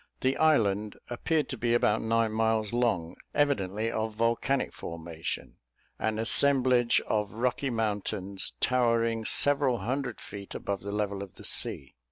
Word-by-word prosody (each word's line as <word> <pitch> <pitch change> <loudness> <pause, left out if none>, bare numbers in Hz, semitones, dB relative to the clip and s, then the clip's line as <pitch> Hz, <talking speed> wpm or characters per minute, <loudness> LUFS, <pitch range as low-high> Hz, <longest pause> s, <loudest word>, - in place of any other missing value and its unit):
The 130 +1 +2
island 105 -10 +2
appeared 155 +5 0
to 130 - -4
be 120 +1 +1
about 110 -2 +2
nine 115 0 +1
miles 110 -1 0
long, 110 -9 0 0.2
evidently 110 -6 +1
of 110 -1 -3
volcanic 115 +4 0
formation, 80 -1 -6 0.4
an 110 0 -1
assemblage 125 +1 +4
of 105 -1 -2
rocky 125 +4 -1
mountains 100 -4 -2
towering 115 -2 +1
several 140 -2 +4
hundred 125 +3 -3
feet 100 -1 -9
above 100 -1 -3
the 100 - -5
level 100 -1 -2
of 100 -2 -9
the - - -8
sea. 65 - +1
115 Hz, 140 wpm, -28 LUFS, 100-125 Hz, 0.4 s, assemblage